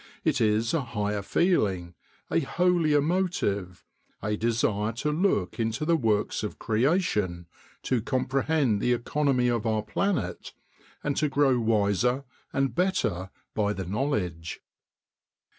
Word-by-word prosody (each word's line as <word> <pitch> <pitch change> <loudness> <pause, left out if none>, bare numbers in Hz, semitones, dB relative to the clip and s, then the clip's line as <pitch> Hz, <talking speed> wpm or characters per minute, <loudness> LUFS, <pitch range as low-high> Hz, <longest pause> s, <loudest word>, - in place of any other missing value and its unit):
It 145 -5 +1
is 110 +1 +2
a 165 - +2
higher 105 -4 -2
feeling, 100 - +1 0.4
a 80 - +3
holier 170 - +2
motive, 140 - -1 0.3
a 105 0 -1
desire 110 -1 0
to 150 +7 -1
look 150 - 0
into 115 +5 -1
the 170 +1 +3
works 110 -8 +1
of 105 - -5
creation, 110 - 0 0.4
to 125 -3 +1
comprehend 130 -1 +1
the 125 - +3
economy 125 +1 +1
of 120 -2 0
our 110 -1 +1
planet, 110 - -2 0.5
and 145 -1 0
to 150 - +2
grow 135 -2 +3
wiser 115 +3 +1 0.3
and 135 0 0
better 165 - 0 0.2
by 105 -1 +1
the 95 -2 -5
knowledge." 90 - -2
115 Hz, 125 wpm, -27 LUFS, 105-145 Hz, 0.5 s, a